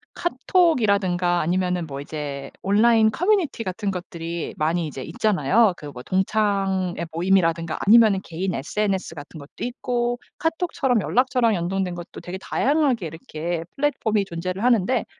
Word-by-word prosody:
카톡이라든가 205 - +2
아니면은 180 0 0
뭐 135 -1 -6
이제 140 -2 -6
온라인 220 +2 +4
커뮤니티 360 - +1
같은 200 +1 -3
것들이 170 -2 -5
많이 165 +2 0
이제 135 -2 -7
있잖아요. 205 - +2
그 150 - -9
뭐 125 -2 -9
동창회 190 -2 0
모임이라든가 165 -2 +1
아니면은 215 -2 +6
개인 180 +3 -3
SNS 190 +4 -2
같은 145 +1 -10
것도 140 0 -10
있고 245 -1 -2 0.2
카톡처럼 320 - 0
연락처랑 250 -2 +2
연동된 180 +1 -2
것도 175 -1 -9
되게 180 +1 -6
다양하게 265 - +1
이렇게 160 +1 -5
플랫폼이 235 -7 +1
존재를 185 +3 -4
하는데 240 0 +2
190 Hz, 360 characters per minute, -23 LUFS, 170-235 Hz, 0.2 s, 아니면은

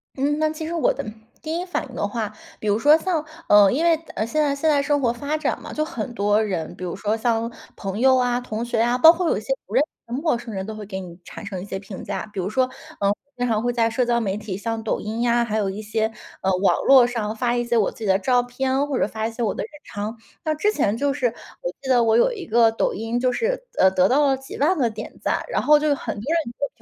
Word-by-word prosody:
嗯， 290 +3 0
那 310 0 +2
其 315 0 -5
实 335 - -4
我 420 +9 +2
的 - - -5 0.4
第 320 +1 -3
一 - - -2
反 355 -5 -3
应 255 - -12
的 205 - -1
话， 215 -1 -3 0.3
比 215 - -5
如 205 +2 +2
说 295 +4 +6
像 330 -2 -1 0.2
呃， 205 -2 +7
因 315 +6 +1
为 335 -1 +5 0.2
呃， 215 - 0
现 305 +7 0
在 285 -1 +1
现 315 +3 +1
在 285 -2 +4
生 290 0 +1
活 240 -3 +1
发 285 +5 -2
展 310 - -1
嘛， - - -8
就 305 0 -1
很 240 -4 -5
多 205 0 +2
人， 180 -6 -3
比 185 - -9
如 175 - -3
说 215 +1 -1
像 230 0 0 0.3
朋 195 +1 -4
友 260 0 +5
啊、 245 0 +1
同 225 -1 -4
学 230 -1 0
啊， 240 +1 +2
包 320 +6 +9
括 345 -1 0
有 - - +1
一 - - -4
些 - - -1
不 - - -10
认 - - +6
识 - - -11 0.2
的 - - -1
陌 310 -8 +2
生 235 -2 -8
人 190 0 -3
都 220 - -6
会 215 -1 -7
给 190 -1 -5
你 180 -1 -10
产 215 - -9
生 190 -3 -5
一 - - -7
些 195 - -4
评 195 -1 -9
价。 - - -4
比 195 - -4
如 185 +2 -1
说， 255 +3 +1 0.3
呃， 200 0 +2 0.2
经 245 - 0
常 220 -2 +1
会 245 0 0
在 230 -1 +2
社 250 +3 +1
交 240 -1 +2
媒 200 -3 -1
体， 205 -3 -5
像 225 +1 -3
抖 220 - -1
音 220 +2 -4
呀， 240 0 +2
还 220 -1 -2
有 200 -2 0
一 205 +3 -5
些， 220 +1 -1 0.3
呃， 190 - +1
网 195 - +2
络 265 -3 +8
上 220 -3 -2
发 240 +1 0
一 240 - +1
些 235 0 +1
我 210 - +2
自 - - -17
己 220 - -4
的 190 0 +4
照 245 +3 +3
片， 265 +3 -1
或 275 - -1
者 - - +2
发 220 0 -3
一 - - -5
些 235 - -7
我 210 - +1
的 - - -4
日 - - -6 0.2
常。 210 +3 -5 0.3
像 310 -1 -1
之 420 +6 +2
前 220 -6 +1
就 280 +2 +1
是， 250 -1 +1 0.3
我 - - -2
记 270 - -8
得 245 -2 +4
我 225 0 +4
有 - - +4
一 390 -6 -7
个 230 0 +4
抖 225 - 0
音， 225 +3 -2
就 255 0 +2
是， - - -1
呃， 190 - +6
得 185 0 +3
到 290 +3 +4
了 270 - +3
几 270 - -9
万 310 +7 +3
个 240 -4 +2
点 215 0 -8
赞， - - 0
然 - - 0
后 300 0 +5
就 305 - 0
有 290 - +3
很 220 -5 -5
多 - - -6
人 305 -2 -1
就 285 - 0
240 Hz, 315 characters per minute, -23 LUFS, 215-285 Hz, 0.4 s, 包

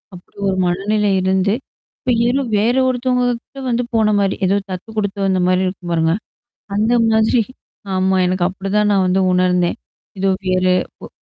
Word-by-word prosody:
அப்படி 180 - -17
ஒரு 190 - -1
மனநிலை 205 +3 0
இருந்து. 190 +2 +1 0.5
இப்ப 255 - -1 0.2
ஏதோ 270 +3 +1 0.2
வேற 230 +4 +2
ஒருத்தவங்ககிட்ட 250 +1 -1
வந்து 240 +1 0
போன 220 -1 +3
மாரி, 195 -1 +1
ஏதோ 195 +2 +2
தத்து 185 +5 -7
குடுத்து 200 -1 -2
வந்த 190 -1 +1
மாரி 185 +1 +2
இருக்கும் 180 -2 -6
பாருங்க. 160 0 +2 0.6
அந்த 220 +3 +1 0.2
மாதிரி. 220 +1 +3 0.5
ஆமா. 190 0 +2
எனக்கு 180 -1 0
அப்படிதான் 195 +2 -1
நான் 190 -2 +3
வந்து 185 +1 +2
உணர்ந்தேன். 180 -1 +2 0.4
எதோ 195 +1 +1 0.2
வேற 185 0 +1 0.4
ஒ - - -6
195 Hz, 155 wpm, -18 LUFS, 185-220 Hz, 0.6 s, போன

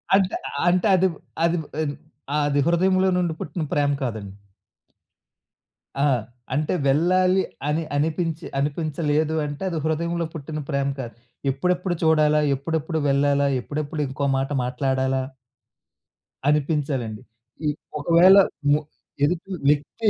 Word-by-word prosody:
అంటే 190 -1 +2 0.3
అంటే 180 +4 +2
అది 185 +1 +4 0.4
అది 170 +1 +2 0.3
అ - - -1 0.6
అది 145 0 +1
హృదయంలో 185 +2 +3
నుండి 175 -2 0
పుట్టిన 165 +2 -4
ప్రేమ 145 -1 +2
కాదండి. 110 -6 -4 1.7
ఆ! - - +4 0.5
అంటే 150 +2 0
వెళ్ళాలి 185 +6 +3 0.3
అని 155 +2 0
అనిపించి 160 +2 -1
అనిపించలేదు 150 +1 0
అంటే 145 +4 -5
అది 170 - -3
హృదయంలో 170 +2 -1
పుట్టిన 155 0 -5
ప్రేమ 140 -2 0
కాదు. 120 -3 -5 0.4
ఎప్పుడెప్పుడు 180 +6 0
చూడాలా? 155 -1 +4
ఎప్పుడెప్పుడు 160 +3 -2
వెళ్ళాలా? 140 0 +3
ఎప్పుడెప్పుడు 150 +2 -4
ఇంకో 135 +2 -3
మాట 135 +1 -1
మాట్లాడాలా 130 +1 0 1.3
అనిపించాలండి. 140 -7 0 0.4
ఈ - - +3 0.3
ఒకవేళ 170 +5 +6 0.4
ము 145 - +4 0.4
ఎదుటి 175 +5 0 0.2
వ్యక్తి 150 +10 +1
150 Hz, 110 wpm, -23 LUFS, 140-170 Hz, 1.7 s, ఒకవేళ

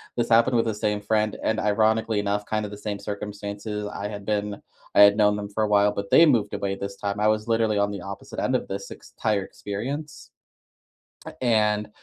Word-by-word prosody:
This 120 -1 -1
happened 115 +2 +4
with 115 - +2
the 110 -2 -1
same 105 0 -1
friend, 105 0 0
and 110 0 +1
ironically 110 +1 +2
enough, 105 0 -1
kinda 110 -1 -2
the 105 - -9
same 105 -1 -4
circumstances. 105 0 -5
I 105 - -5
had 100 -1 -7
been 105 -1 -2 0.3
I - - +6
had 100 0 +7
known 105 -1 +4
them 105 -1 -5
for 110 +2 -1
a - - +1
while, 105 0 +4
but 100 -1 -5
they 165 - +8
moved 115 -8 +2
away 95 -1 -2
this 100 0 -6
time, 100 0 -3
I 105 - +3
was 110 0 0
literally 115 -2 +1
on 100 0 +2
the 100 -2 -6
opposite 100 +1 -8
end - - 0
of - - -1
this 100 0 -6
ex - - -12
...tire 105 -2 +2
experience, 135 +12 -6 1.1
and 105 -3 +1
105 Hz, 210 wpm, -25 LUFS, 100-110 Hz, 1.1 s, they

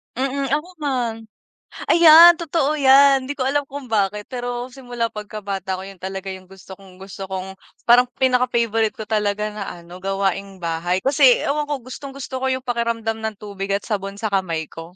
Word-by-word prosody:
Mm, 270 +1 -2
ako 300 +4 0 0.2
man. 245 -5 -1 0.8
Ayan, 335 +1 +9
totoo 310 -2 0
yan, 270 0 +6
hindi 285 - -4
ko 260 - -2
alam 290 +1 +1
kung 280 -2 -8
bakit, 210 0 0
pero 245 0 -4
simula 245 -3 -4
pagkabata 200 -3 -5
ko, 185 - -7
yun 195 -2 -11
talaga 190 +1 -6
yung 185 -1 -10
gusto 190 0 -15
kong 190 -1 -17
gusto 195 0 -8
kong 190 0 -5 0.3
parang 245 +1 +5
pinaka-favorite 240 -4 +1
ko 220 - -6
talaga 210 -1 -1
na 210 -1 -6
ano, 175 +1 -10
gawaing 195 0 -2
bahay. 170 +2 -2
Kasi, 270 -2 +4
ewan 295 +1 -1
ko, 280 -5 -4
gustong-gusto 265 0 -7
ko 265 - -3
yung 260 0 -2
pakiramdam 230 -2 -2
ng 220 -1 -4
tubig 200 -1 -6
at 200 - -3
sabon 195 -2 -4
sa 215 0 -4
kamay 170 -5 -2
ko. 165 +2 -11
225 Hz, 175 wpm, -21 LUFS, 195-265 Hz, 0.8 s, Ayan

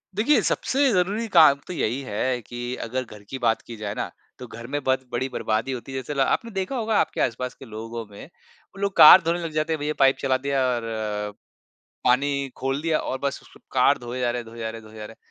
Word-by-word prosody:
देखिए, 235 +9 +3
सबसे 275 +1 +1
ज़रूरी 200 +5 0
काम 160 -8 +6
तो - - -5
यही 130 -5 -1
है 125 +1 -2
कि 120 +2 -5
अगर 130 +3 -2
घर 105 -4 -13
की 135 - -4
बात 115 -2 +1
की 115 - -10
जाए 105 -1 -4
ना - - -3 0.3
तो 125 - -8
घर 115 +1 -9
में 145 +3 -2
बत 130 0 0
बड़ी 120 +2 -1
बर्बादी 110 +1 -1
होती 130 +1 -6
है 135 - -4
जैसे 130 +3 -4
ला 135 -1 +2
आपने 230 -3 -2
देखा 195 +6 -3
होगा 225 -3 0
आपके - - 0
आस-पास 125 +1 -1
के - - -12
लोगों 115 +1 -7
में 100 - -10
वो 175 +4 -21
लोग 200 -1 -1
कार 170 +4 +11
धोने 170 +2 0
लग 165 -2 -4
जाते 155 +1 0
हैं 160 - -3
भैया 150 +1 -1
पाइप 135 -1 +5
चला 130 -1 +1
दिया 135 0 0
और 120 - -4
अ, 105 -2 -3 0.7
पानी 140 +2 +2
खोल 135 +2 -2
दिया 160 -1 +1
और 130 - -3
बस 140 0 -2
उसको - - -19
कार - - +4
धोए 120 +1 -6
जा 120 -1 +1
रहे 120 0 -3
हैं, - - -13
धोए 115 +1 -11
जा 110 -1 -3
रहे 115 0 -8
हैं, 110 - -15
धोए 110 - -15
जा 105 - -7
रहे 110 - -10
हैं, - - -28
130 Hz, 255 wpm, -24 LUFS, 115-155 Hz, 0.7 s, कार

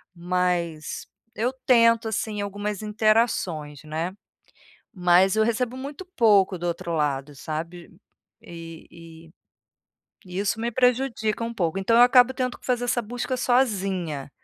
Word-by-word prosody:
mas 175 -3 -2 0.3
eu 240 +4 0
tento, 230 -2 +4
assim, 215 -1 -3
algumas 205 0 -4
interações, 210 - 0
né. 160 +4 -4 0.8
Mas 180 0 +4
eu 220 - +3
recebo 235 +2 -1
muito 285 +7 -7
pouco 200 -5 +4
do 175 +1 -4
outro 170 0 -3
lado, 145 -1 -2
sabe? 165 +4 -6 0.5
E 165 -1 -10
e 165 -1 -14 0.9
e 180 0 -5
isso 205 +2 -1
me 235 +1 -2
prejudica 245 -3 +1
um 230 0 -4
pouco, 175 -5 -1
então, 210 +4 +2
eu 235 - +7
acabo 250 +1 +5
tendo 255 -1 -3
que - - -16
fazer 245 -1 0
essa 245 0 0
busca 245 +3 -4
sozinha. 195 - 0
200 Hz, 135 wpm, -24 LUFS, 170-235 Hz, 0.9 s, eu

